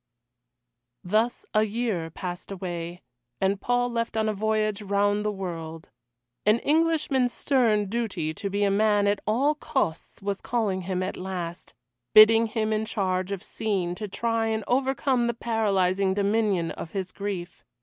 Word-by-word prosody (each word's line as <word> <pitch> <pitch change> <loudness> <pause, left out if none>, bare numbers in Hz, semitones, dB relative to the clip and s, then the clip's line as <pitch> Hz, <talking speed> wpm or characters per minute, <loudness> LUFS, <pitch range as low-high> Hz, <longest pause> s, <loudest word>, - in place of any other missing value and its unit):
Thus 215 +6 0
a 215 - +4
year 215 -6 -1
passed 175 +2 -6
away, 175 -2 -5 0.4
and 195 +1 +1
Paul 245 0 +1
left 230 -1 -2
on 220 0 +1
a 215 - +1
voyage 215 0 0
round 205 +1 +1
the 210 - 0
world. 165 -5 -6 0.5
An 210 +2 +4
Englishman's 300 -5 +2
stern 230 -8 +2
duty 195 -7 -2
to 200 +4 -4
be 200 +1 0
a 200 - +3
man 205 0 +3
at 200 0 +2
all 265 +8 +3
costs 275 - -2
was 200 0 -3
calling 210 -6 -1
him 185 -1 0
at - - -4
last 180 -2 -6 0.4
bidding 225 +1 +8
him 220 0 -1
in 215 0 0
change 185 -3 -1
of 195 -1 -4
scene 195 -7 -2
to 210 +4 -5
try 230 +2 -1
and 220 -1 -1
overcome 260 -1 +1
the 235 - -1
paralysing 195 -5 +1
dominion 200 -4 +1
of 160 - -8
his 190 -2 -3
grief. 185 -9 -5
205 Hz, 155 wpm, -26 LUFS, 190-225 Hz, 0.5 s, bidding